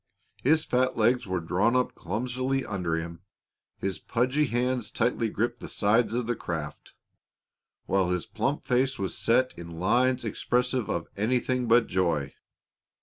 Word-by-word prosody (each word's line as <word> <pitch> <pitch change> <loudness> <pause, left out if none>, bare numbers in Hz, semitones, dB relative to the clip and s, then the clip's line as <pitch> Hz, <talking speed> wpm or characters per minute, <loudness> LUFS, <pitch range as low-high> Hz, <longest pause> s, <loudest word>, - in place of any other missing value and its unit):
His 155 +4 +3
fat 130 +1 +1
legs 120 +1 +2
were 95 -1 -1
drawn 95 +8 +1
up 125 0 +1
clumsily 125 +7 -2
under 90 -5 -2
him, 85 0 -5 0.6
his 95 -1 -3
pudgy 130 +5 +1
hands 125 -1 0
tightly 115 -1 0
gripped 120 +3 -2
the - - -7
sides 110 +3 +2
of 125 -1 0
the 120 +1 -1
craft, 80 -7 -6 0.9
while 95 -2 +1
his 90 -1 -1
plump 135 +6 -2
face 130 +1 +1
was 95 -1 -2
set 125 +3 +2
in 85 -1 -9
lines 120 +6 +2
expressive 125 +2 0
of 85 -1 -2
anything 125 +3 0
but 115 +1 +5
joy. 85 -7 0
115 Hz, 145 wpm, -27 LUFS, 95-125 Hz, 0.9 s, but